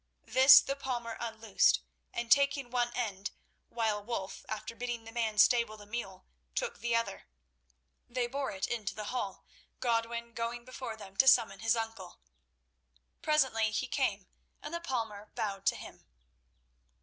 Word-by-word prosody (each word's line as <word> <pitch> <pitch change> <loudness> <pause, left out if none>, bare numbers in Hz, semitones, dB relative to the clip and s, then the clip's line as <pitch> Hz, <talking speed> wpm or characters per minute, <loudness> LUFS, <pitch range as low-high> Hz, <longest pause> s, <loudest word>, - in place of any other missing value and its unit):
This 265 0 +9
the 275 - -3
palmer 240 -4 -4
unloosed, 225 -3 +2 0.3
and 235 0 -4
taking 280 -3 +4
one 240 -1 +1
end, 205 -5 -2 0.4
while 220 -3 -1
Wulf, 205 -4 -4
after 220 +1 -5
bidding 240 -1 -4
the 225 - -10
man 225 -2 -1
stable 235 0 +4
the 205 - -12
mule, 205 -4 -6 0.3
took 475 -1 -2
the 235 -1 0
other, 230 - -2 0.8
they 245 0 0
bore 270 +3 -3
it 190 -1 -2
into 220 -5 -3
the 210 -1 -5
hall, 200 -7 -4 0.3
Godwin 235 0 -1
going 235 +1 -3
before 255 -3 -6
them 195 -3 -11
to 265 - +5
summon 200 -6 +5
his 225 +2 +2
uncle. 225 -5 -5 1.0
Presently 265 -8 +2
he 220 +4 -1
came 230 -7 -1 0.4
and 300 - -6
the 340 - -3
palmer 225 -9 -4
bowed 200 -4 -3
to - - +4
him. - - -11
230 Hz, 150 wpm, -32 LUFS, 215-250 Hz, 1.0 s, This